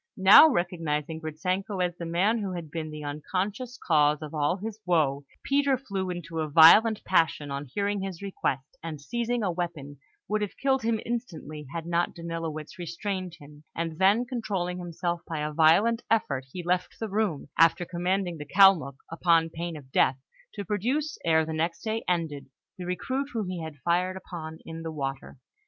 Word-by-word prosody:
Now 195 +10 +9
recognising 165 - -2
Gritzenko 185 +6 -2
as 175 -1 0
the 170 -1 -6
man 195 +7 +2
who 195 -3 -3
had 170 -4 -6
been 160 -1 -4
the 150 0 -7
unconscious 195 - -3
cause 150 -2 +2
of 150 - -8
all 150 +3 +1
his 215 +2 -6
woe, 145 -6 +1 0.2
Peter 280 -1 +2
flew 195 -7 -4
into 170 -2 -5
a 155 -1 -1
violent 205 +9 +7
passion 160 -5 +1
on 140 +1 -4
hearing 200 +8 -1
his 190 -3 -5
request, 140 -9 -3
and, 160 -2 -6
seizing 235 - -2
a 185 - +1
weapon, 160 -5 -5 0.3
would 215 0 0
have 210 - -4
killed 270 -1 +1
him 225 -1 0
instantly, 160 - -5
had 165 0 -5
not 170 0 0
Danilowitz 165 -2 -5
restrained 180 +1 -4
him; 145 +1 -15
and 165 -1 -3
then 200 +6 +4
controlling 195 -8 -3
himself 175 0 -3
by 160 -2 -3
a 150 0 -3
violent 195 +10 +4
effort, 140 -12 +1
he 180 - -6
left 180 +1 -1
the 225 - -2
room, 200 -9 -1
after 165 +2 +5
commanding 180 0 -1
the 150 - -6
Kalmuk, 185 -7 +5 0.2
upon 165 -1 +3
pain 170 0 -5
of 135 -3 -14
death, 130 0 +3 0.4
to 205 -1 -5
produce, 260 +10 -1
ere 160 -1 +3
the 160 - -4
next 165 +2 -2
day 225 0 -2
ended, 160 -6 -1 0.3
the 180 -2 -7
recruit 260 +10 -2
whom 220 -5 -2
he 180 -2 -4
had 160 -2 -7
fired 180 +2 +1
upon 160 -4 -8
in 165 0 -7
the 165 0 -5
water. 135 -3 -5
175 Hz, 180 wpm, -27 LUFS, 155-200 Hz, 0.4 s, Now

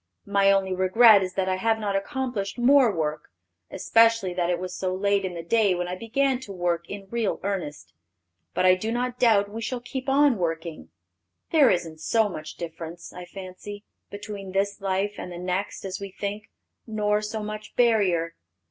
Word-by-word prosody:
My 200 -1 +3
only 195 -1 +1
regret 200 +3 +6
is 185 -1 -4
that 190 -1 0
I 185 0 0
have 225 +3 +1
not 205 -2 -2
accomplished 215 0 -3
more 255 -1 +5
work; 155 -4 -2 0.4
especially 225 -5 +3
that 175 -1 0
it 175 - +1
was 180 0 -6
so 185 -1 -2
late 200 +1 +1
in 185 -2 -4
the 165 - -6
day 205 +1 +2
when 175 0 -2
I 180 - -3
began 255 +5 0
to 255 -6 -9
work 175 -2 -2
in 200 -1 -7
real 230 -3 -1
earnest. 150 - -4 0.6
But 185 - +2
I 185 - +7
do 215 +5 -2
not 250 +1 -2
doubt 215 -4 +4
we 225 +2 -6
shall 250 +2 -3
keep 260 +2 -5
on 275 -4 +4
working.... 165 -1 -3 0.6
There 305 -5 +6
isn't 165 -3 -1
so 220 +5 +2
much 155 -4 -7
difference, 165 0 -8
I 180 - -8
fancy, 195 +2 -9 0.3
between 205 -2 -7
this 200 +1 -1
life 195 +1 -1
and 180 - -6
the 175 - -7
next 185 +3 -3
as 190 -1 -4
we 200 - -5
think, 205 +2 -5 0.4
nor 210 -1 0
so 215 0 -4
much 215 0 -7
barrier.... 195 -9 +2
200 Hz, 185 wpm, -25 LUFS, 180-225 Hz, 0.6 s, I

